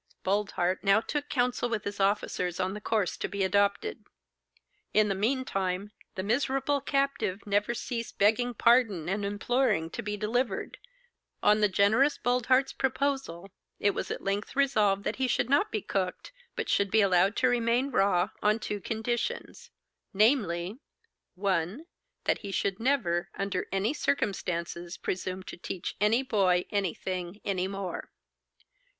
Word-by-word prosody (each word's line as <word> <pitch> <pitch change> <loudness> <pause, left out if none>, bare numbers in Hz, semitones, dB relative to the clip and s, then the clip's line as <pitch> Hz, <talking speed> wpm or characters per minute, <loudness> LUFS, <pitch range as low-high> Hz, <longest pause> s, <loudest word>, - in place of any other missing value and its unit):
Boldheart 190 -2 0
now 200 +1 +5
took 290 +5 -3
counsel 245 -1 0
with 220 -3 -2
his 200 0 -5
officers 195 -3 0
on 185 0 0
the 210 - -7
course 210 -6 0
to - - -2
be 200 -1 -2
adopted. 200 - +1 0.9
In 210 0 +5
the - - +2
mean 250 +7 0
time, 195 -1 -2 0.2
the 185 - -3
miserable 270 +5 +1
captive 275 -9 -1
never 205 +3 +1
ceased 235 0 -5
begging 235 +4 +2
pardon 225 -8 +3
and 195 +3 -1
imploring 205 -4 0
to - - -4
be 210 0 -3
delivered. 215 0 -1 0.6
On 210 +1 +5
the 210 - +5
generous 220 +10 +3
Boldheart's 255 +2 +2
proposal, 265 -9 -2 0.3
it 205 - +3
was - - -4
at - - -4
length 200 +5 -2
resolved 215 -8 +2
that - - -2
he 260 -1 +1
should 250 0 0
not 285 - +3
be 215 - -2
cooked, 185 - -3 0.2
but - - -3
should 200 0 +2
be 220 +3 +4
allowed 190 +1 +3
to 255 - +3
remain 245 +2 +1
raw, 195 -3 +2
on 210 +1 +3
two 210 -2 -4
conditions, 240 - -3 0.5
namely: 205 -3 +2 0.6
1. 190 - -1 0.4
That - - +1
he 200 - -6
should 195 +1 -1
never, 225 -10 +1
under 195 -2 -2
any 195 +7 +1
circumstances, 175 - -2
presume 185 0 -3
to - - -9
teach 175 0 -5
any 225 +5 +3
boy 190 -7 +2
anything 185 -1 -2
any 185 -2 0
more. 195 -2 -5
205 Hz, 150 wpm, -29 LUFS, 190-245 Hz, 0.9 s, now